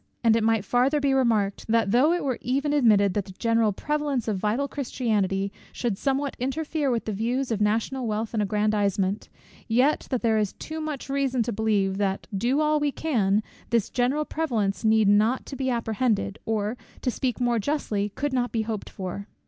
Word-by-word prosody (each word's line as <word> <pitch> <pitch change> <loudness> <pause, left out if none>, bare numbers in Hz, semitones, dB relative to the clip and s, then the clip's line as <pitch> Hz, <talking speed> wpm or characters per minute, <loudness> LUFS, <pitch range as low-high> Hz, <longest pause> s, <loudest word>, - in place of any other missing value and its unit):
And 225 -1 +5
it 230 - +1
might 225 -2 +2
farther 255 +7 +2
be 280 -1 +2
remarked, 225 -7 +1
that 225 -3 +2
though 260 +8 +4
it 350 - 0
were 260 -4 -1
even 275 +4 0
admitted, 210 -8 +4
that 205 -1 -1
the 190 - -11
general 230 +1 +2
prevalence 290 +1 -2
of 205 -4 -1
vital 220 +8 0
Christianity 210 -8 -1 0.2
should 235 -5 -2
somewhat 275 +5 -1
interfere 290 +3 -1
with 235 -2 -1
the 220 - -2
views 240 +5 -1
of 215 -2 -1
national 230 +4 0
wealth 220 +1 -2
and 220 - +1
aggrandisement; 205 -1 0 0.4
yet 250 +6 +2
that 255 -3 -1
there 220 -2 +3
is 210 -3 -1
too 315 0 -6
much 305 -3 -4
reason 270 -3 0
to 235 - -3
believe 200 -3 +1
that, 195 -1 -1
do 245 +9 +1
all 305 0 +2
we 295 -1 +1
can, 215 -10 +1 0.3
this 230 -4 +1
general 265 +5 +1
prevalence 230 -14 -1
needs 220 -1 +4
not 220 +5 +2
to 275 - -7
be 265 -1 -1
apprehended, 225 -3 0
or, 220 +1 -1 0.3
to 250 - +1
speak 250 0 -2
more 240 -2 +1
justly, 210 -5 -1
could 285 +7 -3
not 245 -1 0
be 225 -2 0
hoped 220 -2 -4
for. 195 +2 -6
230 Hz, 190 wpm, -25 LUFS, 210-270 Hz, 0.4 s, And